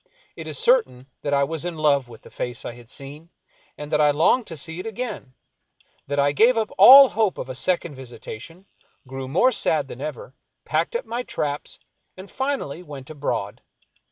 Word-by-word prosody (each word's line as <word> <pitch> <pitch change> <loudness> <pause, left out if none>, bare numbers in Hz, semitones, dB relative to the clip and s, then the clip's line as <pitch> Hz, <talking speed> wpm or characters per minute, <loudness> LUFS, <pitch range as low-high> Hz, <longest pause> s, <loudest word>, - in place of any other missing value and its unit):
It - - -8
is - - -3
certain 470 - +2 0.2
that 145 - -3
I 140 0 +3
was 160 +2 -3
in 175 -2 -4
love 140 -4 +2
with 115 -2 -14
the - - -15
face 125 -1 -5
I - - -4
had 120 -1 -15
seen, 145 +4 -10 0.5
and 150 +1 -8
that 150 -1 +2
I 150 - +5
longed 160 - +2
to 165 - -7
see 160 +4 -5
it 185 - -6
again; 215 - -6 0.7
that 140 +1 -3
I 140 0 +3
gave 230 - +4
up 220 -1 -1
all 275 +1 +10
hope 215 -4 0
of 130 - -6
a - - -4
second 170 +4 -1
visitation, 130 - -10 0.4
grew 135 0 -6
more 175 - +3
sad - - 0
than - - -10
ever, - - -6 0.3
packed - - -1
up 480 - -2
my 240 +1 -3
traps, 145 -11 -4 0.4
and 190 +1 -11
finally 265 - -3
went 145 -5 -10
abroad. 125 -6 -4
150 Hz, 190 wpm, -23 LUFS, 135-220 Hz, 0.7 s, all